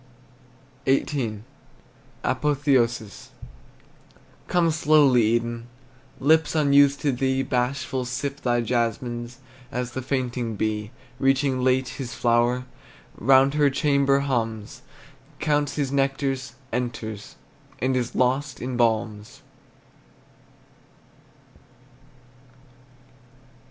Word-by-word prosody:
XVIII. 130 -6 0 0.8
APOTHEOSIS. 130 -6 0 1.2
Come 170 -2 +2
slowly, 150 -5 +4
Eden! 115 +1 0 0.5
Lips 160 +3 +3
unused 140 -2 +4
to 145 - +2
thee, 130 +1 0
Bashful, 130 +1 -1
sip 140 +3 -4
thy 120 -1 +1
jasmines, 120 +1 -2 0.3
As 125 0 -3
the 130 - -4
fainting 125 -3 -2
bee, 105 0 -2 0.3
Reaching 135 -1 +1
late 130 0 +2
his 130 -3 -6
flower, 120 +1 +2 0.5
Round 135 +4 +4
her 150 -1 +3
chamber 140 -1 +2
hums, 115 -6 -3 0.6
Counts 145 -2 0
his 140 -3 -1
nectars 135 -2 -1 0.2
enters, 110 -4 -4 0.4
And 130 +2 0
is 125 -2 -2
lost 130 +3 0
in 125 0 -4
balms! 110 -3 -1
130 Hz, 85 wpm, -24 LUFS, 120-140 Hz, 1.2 s, slowly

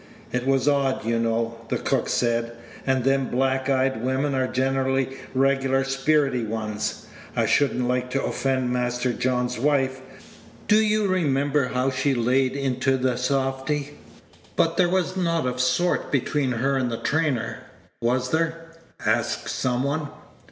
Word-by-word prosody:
"It 125 +1 -2
was 135 0 +2
odd, 140 -5 +1
you 115 0 +1
know," 115 0 -1
the - - 0
cook - - -1
said; 120 -1 0 0.3
"and 130 -1 +2
them 135 0 +2
black 130 +1 0
eyed 130 -3 +1
women 135 +3 0
are 130 -1 +1
generally 135 0 0 0.2
regular 135 0 +2
spirity 135 -1 +1
ones. 110 -1 -3 0.3
I - - +2
should 145 - +2
n't 125 - 0
like 125 0 0
to 135 +2 -1
offend 130 -2 0
Master 125 0 0
John's 125 -1 -1
wife. 135 -1 +1 0.7
Do 210 - +5
you 215 -1 +2
remember 145 -6 +1
how 130 +1 0
she 130 +1 0
paid 125 +2 +2
into 135 -1 0
t' 130 -1 0
softy?" 135 +3 -1 0.6
"But 165 0 +2
there 175 0 +3
was 185 0 0
nought 170 -5 0
o' 125 0 -2
sort 130 +8 +1
between 140 -1 0
her 135 +4 0
and 130 -2 0
the 115 - -3
trainer, 140 -8 -1 0.4
was 125 +2 0
there?' 165 +1 -1 0.3
asked - - 0
some 125 0 0
one. 145 +2 -1
130 Hz, 150 wpm, -24 LUFS, 125-140 Hz, 0.7 s, Do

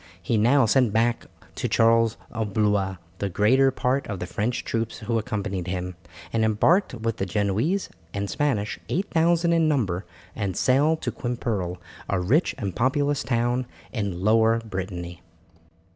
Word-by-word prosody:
He 115 - -1
now 120 +5 +4
sent 120 +1 +3
back 115 +2 +1 0.3
to - - -2
Charles 115 0 +3
of 110 -4 -4
Blois 105 -3 +1 0.2
the 100 - -1
greater 125 +9 +4
part 130 +1 -1
of 100 - -4
the 90 - -4
French 110 +6 -2
troops 115 0 -2
who 115 +1 -1
accompanied 100 -5 -3
him, 90 0 -3 0.4
and 115 -1 +2
embarked 125 - +3
with 115 -1 -2
the 95 - -1
Genoese 105 - 0 0.2
and 100 +2 -3
Spanish, 110 -5 -1
8000 170 -2 +2
in 165 -1 +3
number, 105 - 0 0.3
and 100 -4 -2
sailed 150 +5 +2
to 120 - -1
Quimperle, 115 -7 -3 0.3
a 100 - +1
rich 125 - +2
and 100 -7 -4
populous 140 +3 +1
town 120 +1 0 0.3
in 100 -7 -3
Lower 110 +2 +4
Brittany. 90 -4 -5
115 Hz, 150 wpm, -25 LUFS, 100-130 Hz, 0.4 s, now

